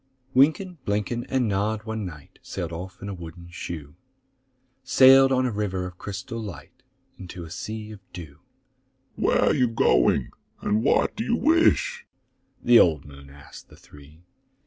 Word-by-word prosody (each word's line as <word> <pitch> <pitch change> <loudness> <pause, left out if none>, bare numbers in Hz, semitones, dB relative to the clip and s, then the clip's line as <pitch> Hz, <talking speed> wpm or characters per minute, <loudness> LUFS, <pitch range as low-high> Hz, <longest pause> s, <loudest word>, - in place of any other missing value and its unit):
Wynken, 160 +6 +2
Blynken, 105 +4 -2
and 130 -3 +1
Nod 105 +2 -1
one 110 -3 -4
night 75 -4 -13
Sailed - - -5
off 90 +3 -8
in - - -5
a 100 - -4
wooden 85 0 -10
shoe,— 80 -5 -7 0.9
Sailed 135 +1 +6
on 130 -1 +2
a 125 - 0
river 100 -3 -2
of 90 -1 -10
crystal 100 +3 -6
light 110 +5 -10 0.4
Into 90 -1 -8
a 80 - -10
sea 110 +3 -6
of 105 - -10
dew. 80 -5 -10 0.8
"Where - - +1
are - - +3
you 130 -4 +2
going, 110 - +2 0.3
and 105 +2 0
what - - +2
do 225 - -3
you 235 0 0
wish?" 340 - +2 0.6
The 120 -1 +7
old 80 -5 +3
moon 70 -1 -13
asked 70 +2 -14
the - - -17
three. 75 +3 -17
105 Hz, 160 wpm, -25 LUFS, 85-125 Hz, 0.9 s, The